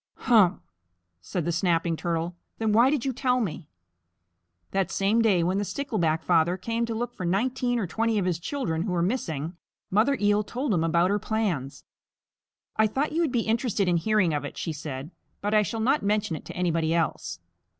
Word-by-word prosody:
"Humph!" 205 -6 +4 0.6
said 165 - -3
the 170 - 0
Snapping 170 -1 +1
Turtle. 170 +1 -2 0.2
"Then 220 -1 0
why 235 +4 +6
did 280 -4 0
you 265 - 0
tell 250 0 +1
me?" 170 - -3 1.0
That 195 -2 0
same 205 +4 +2
day 195 -7 +3
when 185 +3 +1
the - - 0
Stickleback 175 - -1
Father 175 +1 +3
came 230 +3 -2
to 230 - -3
look 240 +1 -3
for 185 - -7
nineteen 245 +7 0
or 220 - 0
twenty 225 +5 0
of 195 - +1
his 175 -3 0
children 175 - -2
who 185 0 -2
were 170 -1 +1
missing, 170 - -2 0.3
Mother 225 +8 +3
Eel 205 0 +3
told 250 +3 -2
him 165 -3 +1
about 170 +3 +2
her 205 - +1
plans. 190 - -2 0.9
"I 220 0 +5
thought 270 +8 -1
you 330 - 0
would 320 -6 +1
be 240 - +1
interested 220 -3 0
in 175 -1 +3
hearing 195 -2 +2
of 145 -1 -1
it," 145 - -7
she 165 - -3
said, 145 0 -6 0.3
"but 205 +1 -2
I 215 - +6
shall 225 +2 -3
not 265 +7 +2
mention 210 -3 0
it 150 - -9
to - - -8
anybody 165 -2 +1
else." 85 - -1
195 Hz, 200 wpm, -26 LUFS, 170-230 Hz, 1.0 s, why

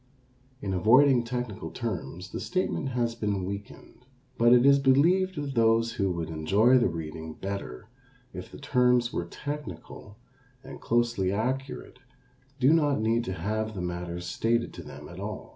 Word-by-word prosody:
In 95 -2 -2
avoiding 125 +6 +5
technical 115 -8 -4
terms 90 - -5
the - - -4
statement 185 -6 -2
has 120 -2 -1
been 105 -4 -2
weakened, 100 +5 -9 0.3
but 120 0 +4
it 125 +1 +6
is 140 0 +6
believed 170 +8 +3
that 145 -2 -4
those 115 -1 +3
who 100 -4 0
would 80 -2 -4
enjoy 100 +11 +4
the 120 - +3
reading 80 -1 -6
better 100 - -6 0.5
if 90 - -8
the - - -10
terms 125 -3 +2
were 85 - -2
technical 105 - -8 0.5
and - - -10
closely 120 -5 +1
accurate 125 +5 -3 0.6
do 135 +4 +5
not 145 -5 +2
need 115 +2 +1
to 95 - -3
have 110 +4 -3
the 95 - -4
matter 85 0 -4
stated 115 +6 -1
to - - -8
them - - -10
at - - -10
all. - - -6
115 Hz, 160 wpm, -27 LUFS, 95-125 Hz, 0.6 s, it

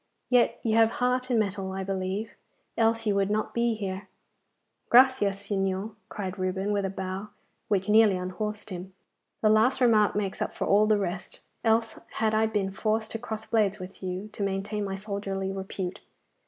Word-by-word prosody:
Yet 240 -1 +4
you 225 -1 +1
have 225 0 +5
heart 250 +1 +1
and 240 -3 +3
mettle, 195 -2 -2
I 190 0 -3
believe, 195 +3 -3 0.4
else 225 0 +2
you 210 - +2
would 200 0 +1
not 215 +1 -1
be 235 -1 +1
here.' 195 -1 -5 0.8
'Gracias, 245 -6 +5
Signor!' 195 +1 -1 0.2
cried 190 -1 -5
Reuben, 190 +2 -1
with 200 -1 0
a - - -1
bow 190 +2 -5 0.4
which 195 -1 +1
nearly 210 -2 +5
unhorsed 210 +3 -4
him; 185 +1 -7 0.5
'the 215 - +5
last 220 +5 +4
remark 220 -5 +4
makes 200 -2 -2
up - - -2
for - - -2
all 210 +1 +4
the 215 -1 +4
rest, 185 -2 -4 0.2
else 225 0 +2
had 220 -1 +1
I 220 +1 +3
been 205 -3 -1
forced 220 +2 -1
to 225 - -4
cross 220 -2 -5
blades 210 -3 +2
with 185 0 -10
you, 185 +2 -4
to 210 - -9
maintain 200 +2 -1
my 195 -1 -3
soldierly 195 -1 -3
repute. 190 -1 -4
205 Hz, 180 wpm, -27 LUFS, 195-220 Hz, 0.8 s, have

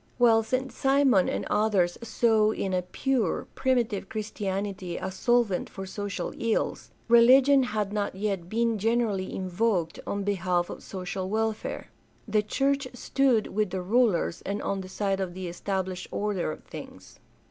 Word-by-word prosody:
While 230 -2 +5
St. 255 +4 -2
Simon 270 -8 +3
and - - -2
others 200 -5 +2
saw 225 -2 +3
in 190 -3 -2
a 180 - +2
pure, 220 +3 -1
primitive 240 -7 0
Christianity 195 -4 -3
a 190 - -4
solvent 235 -1 +1
for 195 - -7
social 205 +1 -4
ills, 230 -1 -1 0.2
religion 260 +4 +7
had 210 -5 -2
not 205 -2 -1
yet 195 -3 -2
been 230 0 +1
generally 220 -3 0
invoked 185 -2 -1
on 200 0 -2
behalf 180 -3 0
of - - -8
social 185 0 -5
welfare. 220 +1 -2 0.4
The 215 - +2
church 275 +5 0
stood 250 -3 +2
with 210 -1 +1
the 185 0 -3
rulers 210 -4 +2
and 200 +1 -3
on 195 -1 -1
the 185 - -9
side 195 0 -1
of 180 -2 -3
the 185 -1 -5
established 185 +1 -3
order 200 -6 -1
of - - -9
things. - - -11
205 Hz, 150 wpm, -27 LUFS, 190-230 Hz, 0.4 s, religion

